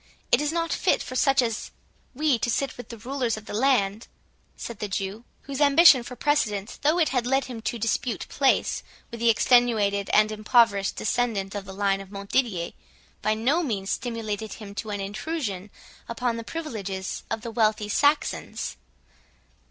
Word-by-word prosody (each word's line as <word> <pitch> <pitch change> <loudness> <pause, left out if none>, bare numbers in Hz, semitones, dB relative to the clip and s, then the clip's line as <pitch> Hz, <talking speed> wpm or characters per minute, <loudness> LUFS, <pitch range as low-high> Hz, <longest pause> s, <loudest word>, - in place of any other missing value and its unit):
—it - - +5
is 295 0 0
not 330 0 -1
fit - - +1
for 255 - -7
such 270 0 +4
as 230 -2 -3 0.5
we 290 -3 +2
to 240 - -1
sit 270 +3 -1
with 245 -2 -10
the 230 - -8
rulers 245 0 -2
of 215 - -10
the - - -8
land," 220 -3 +1 0.5
said 235 -3 -7
the 210 - -2
Jew; 195 +4 -4 0.2
whose 275 +1 -5
ambition 290 -1 +7
for 250 +1 -8
precedence 220 -9 0
though 305 +4 +2
it 325 -4 +3
had 250 -2 0
led 270 +1 +2
him 240 -3 -7
to 235 +2 -2
dispute 230 +1 -1
Place 275 -2 +1 0.3
with 235 - -7
the 235 0 +3
extenuated 220 -4 +3
and 215 0 +4
impoverished 215 -2 +3
descendant 215 -4 -1
of 200 -2 -5
the 190 - -8
line 195 0 0
of 195 - -11
Montdidier, 200 -2 -1 0.5
by 215 +1 +1
no 265 +10 +2
means 205 - -2
stimulated 220 -3 -3
him 205 -2 -9
to 215 +1 -5
an 205 -1 -3
intrusion 205 - -4 0.4
upon 235 0 -1
the 230 - -5
privileges 210 - -5
of 225 - -2
the 230 0 -6
wealthy 215 -2 +1
Saxons. 290 +7 0
230 Hz, 175 wpm, -25 LUFS, 205-260 Hz, 0.5 s, ambition